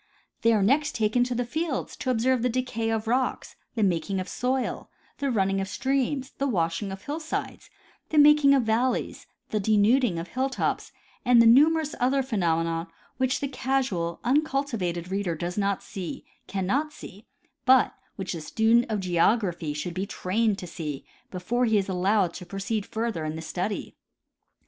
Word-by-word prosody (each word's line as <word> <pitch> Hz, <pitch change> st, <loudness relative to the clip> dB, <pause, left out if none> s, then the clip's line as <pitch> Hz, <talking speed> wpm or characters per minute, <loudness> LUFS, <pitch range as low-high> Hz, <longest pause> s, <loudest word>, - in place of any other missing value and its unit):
They 230 Hz, -, +4 dB
are 215 Hz, -3 st, +3 dB
next 275 Hz, +5 st, +2 dB
taken 225 Hz, +2 st, +2 dB
to 250 Hz, 0 st, -3 dB
the 245 Hz, +1 st, -1 dB
fields 310 Hz, +2 st, -3 dB
to 260 Hz, -, -3 dB
observe 250 Hz, +1 st, +2 dB
the 250 Hz, -, +1 dB
decay 235 Hz, -2 st, -2 dB
of 225 Hz, 0 st, -1 dB
rocks, 250 Hz, +2 st, -1 dB, 0.2 s
the 220 Hz, -, +1 dB
making 185 Hz, 0 st, 0 dB
of 185 Hz, -, -4 dB
soil, 255 Hz, +1 st, -2 dB, 0.3 s
the 280 Hz, -1 st, 0 dB
running 195 Hz, -4 st, +1 dB
of 195 Hz, -, -3 dB
streams, 265 Hz, +3 st, -1 dB
the 280 Hz, -, +1 dB
washing 175 Hz, -2 st, -1 dB
of 195 Hz, +1 st, -8 dB
hillsides, 310 Hz, +2 st, -4 dB, 0.4 s
the 315 Hz, -, -1 dB
making 295 Hz, -1 st, +7 dB
of 265 Hz, -, +2 dB
valleys, 230 Hz, +3 st, 0 dB, 0.2 s
the 215 Hz, -, 0 dB
denuding 215 Hz, 0 st, +3 dB
of 165 Hz, +1 st, -5 dB
hilltops, 265 Hz, +1 st, -1 dB, 0.3 s
and 245 Hz, -2 st, +5 dB
the 230 Hz, -, +7 dB
numerous 300 Hz, +6 st, +5 dB
other 265 Hz, +2 st, +2 dB
phenomena 165 Hz, -7 st, 0 dB, 0.3 s
which 260 Hz, -1 st, 0 dB
the 280 Hz, -, 0 dB
casual, 255 Hz, -11 st, -1 dB
uncultivated 240 Hz, -, 0 dB
reader 195 Hz, -4 st, -1 dB
does 175 Hz, +3 st, -4 dB
not 200 Hz, -1 st, 0 dB
see, 185 Hz, -3 st, -7 dB, 0.2 s
cannot 225 Hz, +11 st, -1 dB
see, 205 Hz, -6 st, -12 dB, 0.4 s
but 260 Hz, -2 st, +5 dB, 0.2 s
which 190 Hz, -2 st, -4 dB
the 165 Hz, -, -5 dB
student 225 Hz, +8 st, +3 dB
of 210 Hz, -3 st, -1 dB
geography 175 Hz, -2 st, +1 dB
should 150 Hz, +4 st, -4 dB
be 190 Hz, +3 st, -3 dB
trained 210 Hz, +2 st, 0 dB
to 180 Hz, -, -7 dB
see 155 Hz, -5 st, -6 dB, 0.2 s
before 235 Hz, +7 st, -1 dB
he 220 Hz, -2 st, +3 dB
is 195 Hz, -, 0 dB
allowed 190 Hz, -1 st, +1 dB
to 180 Hz, -, -8 dB
proceed 195 Hz, +3 st, -3 dB
further 225 Hz, -7 st, -2 dB
in 155 Hz, 0 st, -3 dB
the 160 Hz, -, -5 dB
study. 185 Hz, +5 st, -4 dB
220 Hz, 170 wpm, -26 LUFS, 185-255 Hz, 0.4 s, making